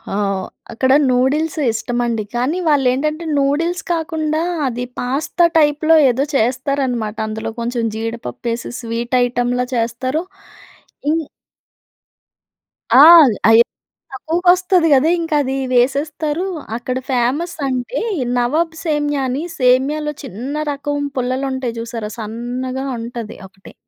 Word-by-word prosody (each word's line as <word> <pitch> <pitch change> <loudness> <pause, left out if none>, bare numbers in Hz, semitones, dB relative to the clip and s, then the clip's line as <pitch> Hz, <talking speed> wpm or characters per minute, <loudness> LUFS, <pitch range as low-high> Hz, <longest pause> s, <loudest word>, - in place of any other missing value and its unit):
ఆహ్, 195 -2 -1 0.2
అక్కడ 260 +3 +1 0.2
నూడిల్స్ 295 +7 +1
ఇష్టమండి. 235 0 -2
కానీ 255 +8 0
వాళ్ళేంటంటే 295 +3 +1
నూడిల్స్ 320 +5 0
కాకుండా 315 -1 -1 0.3
అది 245 -1 -3 0.2
పాస్తా 280 +7 +1
టైప్‌లో 310 +1 +4
ఏదో 255 +3 +1
చేస్తారనమాట. 250 -2 0
అందులో 220 +1 -4
కొంచెం 235 +1 -2
జీడిపప్పు 225 - -5
ఎసెసి 235 +1 -6
స్వీట్ 235 +1 -3
ఐటెమ్‌లా 245 0 0
చేస్తారు. 240 +6 -1 0.9
ఇన్ 325 +1 0 1.8
ఆల్ 310 -7 +9
అయి 225 +1 +7 0.5
తక్కువగొస్తది 355 +4 +2
కదా 280 +4 +4
ఇంక 330 -1 -4
అదీ 265 0 -2 0.2
వేసేస్తారూ. 295 +6 0 0.3
అక్కడ 250 +1 -3
ఫేమస్ 270 +7 0
అంటే, 255 - -2 0.4
నవాబ్ 315 +7 0
సేమ్య 295 -3 0
అని 260 +5 -2 0.2
సేమ్యాలో 275 +4 +2
చిన్న 255 +2 -6 0.2
రకం 290 +1 -3 0.2
పుల్లలుంటాయి 255 -1 -2
చూసారా? 230 -2 -5
సన్నగా 245 +4 -4
ఉంటది 230 -1 -7
ఒకటి. 195 0 -16
260 Hz, 105 wpm, -18 LUFS, 240-300 Hz, 1.8 s, ఆల్